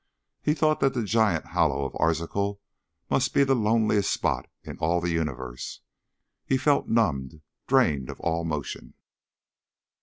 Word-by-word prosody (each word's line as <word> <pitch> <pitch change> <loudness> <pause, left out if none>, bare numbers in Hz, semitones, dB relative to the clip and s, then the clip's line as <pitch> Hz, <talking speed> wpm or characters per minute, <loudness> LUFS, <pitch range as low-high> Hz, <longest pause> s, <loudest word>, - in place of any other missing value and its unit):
He 150 - +1
thought 155 -1 +2
that 135 -1 +2
the 120 - 0
giant 105 -6 +2
hollow 70 -3 +1
of 70 - -5
Arzachel 100 +5 0 0.5
must - - +1
be 140 - +6
the 135 -1 +3
loneliest 110 -2 +2
spot - - -1
in - - -9
all 85 +2 +1
the 85 0 -1
universe. 65 -6 -4 0.6
He 135 - +1
felt 140 +2 +2
numbed, 75 - 0 0.2
drained 80 - +2
of - - -7
all 85 0 -1
motion. 75 -4 -5
85 Hz, 145 wpm, -26 LUFS, 75-115 Hz, 0.6 s, be